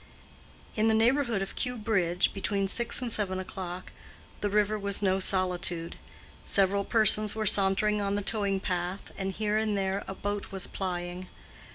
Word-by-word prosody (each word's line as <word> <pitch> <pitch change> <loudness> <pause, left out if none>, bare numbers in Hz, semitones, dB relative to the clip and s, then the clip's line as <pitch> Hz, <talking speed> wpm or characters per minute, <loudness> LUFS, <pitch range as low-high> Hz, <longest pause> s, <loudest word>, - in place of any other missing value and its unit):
In 215 +1 +2
the 220 - +3
neighborhood 235 -2 +2
of 195 - -8
Kew 250 -1 -2
Bridge, 190 -5 +1
between 195 0 -1
six 235 +5 0
and 240 - -3
seven 195 -3 -1
o'clock, 185 -1 -7 0.5
the 205 - -1
river 210 +1 +1
was 200 0 -1
no 190 -1 +2
solitude. 180 -3 +2 0.5
Several 200 0 +2
persons 215 -1 +3
were 220 -1 -2
sauntering 205 +1 +3
on 200 0 -1
the 205 - -2
towing 200 -2 +1
path, 180 +1 -4
and 195 0 -3
here 210 +1 -1
and 215 -2 0
there 195 0 -1
a 195 - -5
boat 205 +1 -4
was 195 -1 -2
plying. 180 -1 -5
200 Hz, 165 wpm, -28 LUFS, 190-215 Hz, 0.5 s, the